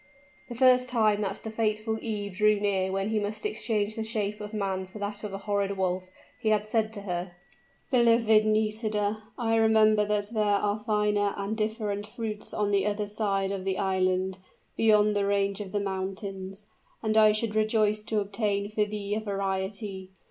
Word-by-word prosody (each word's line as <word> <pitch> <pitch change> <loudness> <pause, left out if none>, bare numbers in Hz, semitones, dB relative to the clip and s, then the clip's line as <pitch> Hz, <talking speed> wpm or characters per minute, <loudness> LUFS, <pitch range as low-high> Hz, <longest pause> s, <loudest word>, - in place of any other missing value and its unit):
The 240 - -6
first 255 0 +5
time 215 -4 +2
that 200 0 -3
the 220 - -5
fatal 220 0 -1
eve 205 -3 -3
drew 215 0 +5
near 195 -2 0
when 195 +2 -1
he 220 -1 +1
must 210 +1 -4
exchange 215 -1 -1
the 225 - -2
shape 210 -2 -3
of 210 0 -6
man 195 -3 -2
for 190 - -11
that 205 +1 -5
of 210 - -4
a 195 - -4
horrid 200 -1 -1
wolf, 185 0 -1 0.3
he 220 - 0
had 210 -1 +2
said 220 0 +1
to 205 - -6
her, 180 -2 -4 0.6
"Beloved 230 -3 +5
Nisida, 215 -1 0 0.2
I 225 -2 0
remember 220 -1 +5
that 210 +1 -1
there 215 - +1
are 205 0 +1
finer 210 -2 +1
and 200 +2 -2
different 215 -1 -2
fruits 215 -1 -5
on 205 -1 0
the 200 0 +2
other 210 0 -1
side 200 -2 -1
of 195 -2 -3
the 190 0 -1
island, 185 -1 0 0.4
beyond 210 -1 +4
the 200 -1 +1
range 200 0 0
of 195 -2 -7
mountains; 195 0 -5 0.4
and 220 -1 0
I 215 -1 +7
should 215 0 -1
rejoice 215 -1 +2
to 215 -1 0
obtain 200 0 -1
for 210 0 +1
thee 205 -1 -4
a 215 - 0
variety. 195 -1 -3
210 Hz, 180 wpm, -28 LUFS, 200-215 Hz, 0.6 s, I